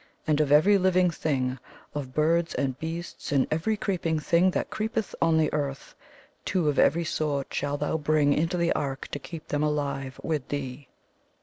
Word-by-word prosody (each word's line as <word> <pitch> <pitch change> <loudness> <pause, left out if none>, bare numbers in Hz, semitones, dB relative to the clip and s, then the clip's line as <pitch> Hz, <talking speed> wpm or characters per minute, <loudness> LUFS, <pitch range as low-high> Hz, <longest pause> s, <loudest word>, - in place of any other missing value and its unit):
And 155 -1 +2
of 145 -2 0
every 195 +8 +6
living 185 -1 +3
thing, 135 -5 -1 0.3
of 140 -3 -4
birds, 165 +4 +1
and 130 -2 -1
beasts, 165 0 -5
and 140 -2 +3
every 185 +8 0
creep 195 -3 -2
ing 160 -1 +1
thing 170 +4 +3
that - - -2
creepeth 220 0 -2
on 165 -1 +4
the 155 -1 +2
earth, 140 -2 -3 0.5
two 180 -4 0
of 145 - 0
every 170 +1 +4
sort 145 -3 -2
shalt 145 0 -2
thou 150 +2 0
bring 150 -1 +3
into 165 +4 0
the 170 -1 +2
ark 135 -1 -3
to 145 - -4
keep 160 +2 -9
them 145 - 0
alive 140 -3 -2
with 150 -5 -2
thee.' 135 -1 -5
155 Hz, 185 wpm, -27 LUFS, 145-170 Hz, 0.5 s, every